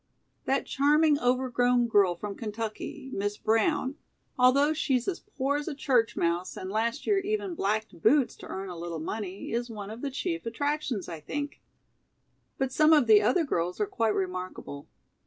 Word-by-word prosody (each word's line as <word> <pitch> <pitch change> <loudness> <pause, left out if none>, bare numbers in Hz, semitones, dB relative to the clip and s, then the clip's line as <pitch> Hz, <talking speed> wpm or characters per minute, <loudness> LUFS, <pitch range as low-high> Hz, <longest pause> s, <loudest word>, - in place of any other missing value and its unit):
"That 270 +1 +1
charming 295 +1 +3
overgrown 245 -1 +2
girl 200 -5 +4
from 205 +3 -5
Kentucky, 225 +6 -6
Miss 205 +1 -2
Brown, 260 +5 +1 0.4
although 275 +4 +4
she's 265 -6 0
as 375 - -1
poor 285 -8 -2
as 295 - -5
a 310 - -3
church 255 -6 +1
mouse 170 +2 -1
and 185 - -5
last 230 +6 -1
year 405 -2 +3
even 400 -1 -2
blacked 215 - -2
boots 265 - +4
to - - -10
earn 190 0 -5
a 180 - -6
little 170 -1 -4
money, 195 +4 -5
is 240 +1 -2
one 210 -2 -7
of 225 +2 -8
the 285 - -2
chief 335 0 -3
attractions, 280 -3 -2
I 165 -2 -6
think. 285 - -5 1.0
But 265 -1 -1
some 310 +3 +5
of 295 -5 +5
the 215 -2 +7
other 250 - +3
girls 180 - -2
are - - +2
quite 230 - 0
remarkable. 185 -6 -4
245 Hz, 175 wpm, -28 LUFS, 205-290 Hz, 1.0 s, the